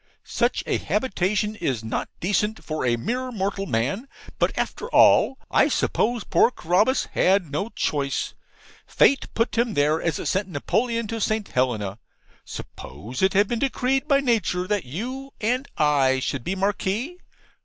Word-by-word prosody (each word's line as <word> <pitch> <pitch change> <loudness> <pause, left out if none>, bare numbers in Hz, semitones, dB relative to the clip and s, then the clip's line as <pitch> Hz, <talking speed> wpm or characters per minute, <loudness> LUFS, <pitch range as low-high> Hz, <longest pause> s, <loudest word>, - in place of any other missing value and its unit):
Such - - 0
a - - 0
habitation 210 -3 0
is 130 - -2
not 110 - -3
decent 210 +4 0
for 155 -2 -3
a 120 - +3
mere 250 - -3
mortal 195 -2 -2
man. 135 - -1 0.3
But, - - +2
after 465 - -3
all, 270 - +5
I - - +4
suppose 235 -1 0
poor - - +4
Carabas 210 +5 +1
had 185 -5 +2
no 155 +10 -2
choice. 140 -10 -2 0.5
Fate 275 - +3
put 230 0 0
him 235 -3 +1
there 150 +3 +2
as 160 -4 -1
it - - -5
sent 190 +1 0
Napoleon 230 - -1
to 225 -1 -3
St. 215 0 0
Helena. 110 -5 -1 0.4
Suppose 120 +5 -8
it 190 0 +3
had 205 +1 +4
been 235 +1 -2
decreed 270 +1 0
by 280 -2 +4
Nature 215 -8 +1
that 205 -4 -1
you 255 - -6
and 250 +5 0
I 140 -3 +3
should 130 -1 -3
be 185 - -2
Marquises? 205 - -1
200 Hz, 155 wpm, -24 LUFS, 150-235 Hz, 0.5 s, all